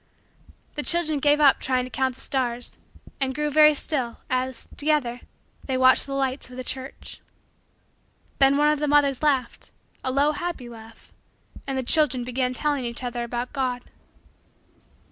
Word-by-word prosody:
The 295 - -3
children 315 0 +2
gave 290 +1 +3
up 285 -3 +5
trying 255 -1 0
to 255 - -8
count 260 -1 -1
the - - -15
stars 245 -2 -3 0.4
and 265 -1 -1
grew 300 0 -1
very 305 +1 +6
still, 260 -6 -2
as, 255 0 -2
together, 285 -5 0 0.4
they 260 -1 -1
watched 260 +1 +5
the 275 - -4
lights 265 -1 -2
of 250 - -11
the 255 - -4
church. 260 +1 -6 1.2
Then 275 0 +5
one 295 +1 +4
of 300 - -1
the 300 - -1
mothers 285 -2 +3
laughed, 270 -5 0 0.3
a - - -1
low 285 +3 +3
happy 345 -6 -5
laugh, 225 -1 -14 0.5
and 270 -1 -2
the 260 - -1
children 260 -2 +2
began 250 +1 -1
telling 290 +1 -1
each 235 +1 -4
other 240 -1 -3
about 240 +2 -4
God. 255 -3 -2
265 Hz, 165 wpm, -24 LUFS, 250-295 Hz, 1.2 s, very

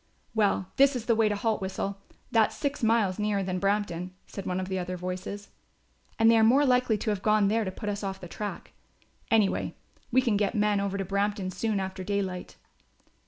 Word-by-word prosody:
"Well, 200 -3 +1
this 275 0 +5
is 240 -2 -4
the 235 - +3
way 220 -1 +3
to 205 - 0
Haltwhistle; 200 -2 -2 0.4
that's 225 -2 +3
six 285 0 -2
miles 220 -4 +2
nearer 210 -2 0
than 185 -1 -2
Brampton," 190 -3 -1
said 195 - -7
one 180 0 -1
of 185 - -3
the 190 0 -2
other 180 0 -4
voices, 185 +3 -5 0.7
"and 225 - +4
they 230 0 +6
are - - +5
more 260 +6 +5
likely 250 -4 +3
to 215 +1 -1
have 200 -2 -2
gone 215 -2 +3
there 225 +2 +2
to 190 - -3
put 210 +3 -7
us 205 0 -2
off 190 -1 -3
the 180 - -8
track. 205 +4 -6 0.6
Anyway, 215 -3 +2 0.4
we 260 +2 +4
can 230 -5 +2
get 205 +2 0
men 210 -1 +2
over 200 0 -1
to 195 - -2
Brampton 200 0 -1
soon 205 +3 -1
after 190 0 -4
daylight." 190 -2 -3
205 Hz, 205 wpm, -28 LUFS, 190-220 Hz, 0.7 s, they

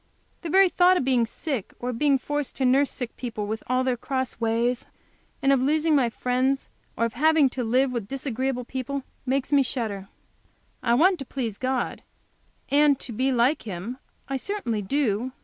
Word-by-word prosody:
The 335 - -5
very 385 +3 +6
thought 360 +1 +4
of 265 - -1
being 250 -3 +2
sick, 265 - -4
or 245 - -4
of 230 - -6
being 285 -2 +4
forced 290 +1 -3
to 265 - 0
nurse 270 +2 +4
sick 245 -2 -6
people, 225 -4 -4
with 220 +2 -3
all 255 +1 +1
their 255 -1 +1
cross 260 0 -3
ways, 230 +2 0 0.6
and 275 0 +5
of 265 - +2
losing 310 +4 +2
my 255 -4 +3
friends, 255 +3 0 0.3
or 230 - +2
of 230 - -3
having 310 +1 +4
to 250 0 -3
live 255 +3 +2
with 235 -5 -3
disagreeable 260 -1 -2
people, 265 +2 -4 0.2
makes 270 +2 0
me 280 - +6
shudder. 220 -7 -3 0.7
I 235 -1 +2
want 360 +7 +4
to 275 - -6
please 235 -6 -4
God, 260 -1 -1 0.7
and 285 -1 +4
to 245 - -7
be 260 +4 0
like 255 +4 +2
Him. 210 +5 -6 0.3
I 270 - -2
certainly 255 - -3
do. 245 +1 0
260 Hz, 185 wpm, -25 LUFS, 235-280 Hz, 0.7 s, very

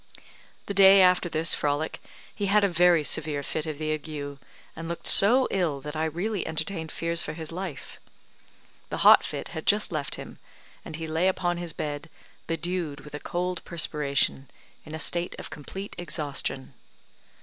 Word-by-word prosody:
The 200 - -4
day 195 0 +8
after 180 -1 +3
this 160 0 +2
frolic, 145 +2 -2 0.3
he 205 - -2
had 205 +1 +4
a - - +5
very 175 -2 +4
severe 145 -1 0
fit 155 +3 -3
of 155 -2 -4
the 155 0 -2
ague, 145 -2 -6 0.4
and 165 0 -7
looked 170 - -5
so 245 +6 +7
ill 170 -7 0
that 150 +2 -7
I 155 +1 0
really 180 +6 -2
entertained 160 0 -3
fears 170 0 -1
for 150 - -4
his 160 0 -6
life. 175 -5 -7 0.9
The - - -2
hot - - +9
fit - - -5
had - - -7
just - - +3
left - - -3
him, - - -10 0.4
and 160 - -8
he 165 +1 -5
lay 160 +3 0
upon 175 -2 0
his 175 -1 -5
bed 150 +1 -5 0.4
bedewed 165 -3 -3
with 150 0 -13
a 150 - -5
cold 180 +2 -3
perspiration, 145 -4 0 0.4
in 155 - -6
a - - -6
state 175 +4 0
of - - -8
complete 190 +7 -8
exhaustion. 150 -5 -3
165 Hz, 170 wpm, -26 LUFS, 150-180 Hz, 0.9 s, hot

